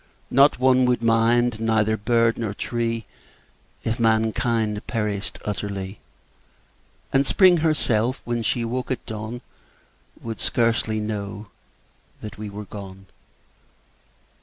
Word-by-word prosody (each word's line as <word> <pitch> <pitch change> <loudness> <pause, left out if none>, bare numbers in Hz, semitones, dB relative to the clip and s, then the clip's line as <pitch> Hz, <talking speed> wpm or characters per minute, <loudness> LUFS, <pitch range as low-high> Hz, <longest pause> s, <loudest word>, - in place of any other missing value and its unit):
Not 140 +3 +5
one 130 0 +4
would 125 -2 +1
mind, 115 0 +3
neither 110 -1 +2
bird 115 +2 +2
nor 110 -3 -3
tree 115 -1 -2 0.8
If 115 +1 -2
mankind 110 -1 +1
perished 105 -3 -3
utterly; 100 -1 -4 1.1
And 135 0 +4
Spring 180 +5 +5
herself, 130 -7 +1
when 120 -1 -1
she 115 +1 0
woke 125 +2 -3
at 130 -3 -3
dawn, 110 +2 -6 0.8
Would 115 -1 -6
scarcely 115 -2 +1
know 105 -1 -5 0.7
that 105 -1 -9
we 105 -1 -5
were 105 +1 -7
gone. 95 -1 -10
115 Hz, 110 wpm, -23 LUFS, 105-120 Hz, 1.1 s, Not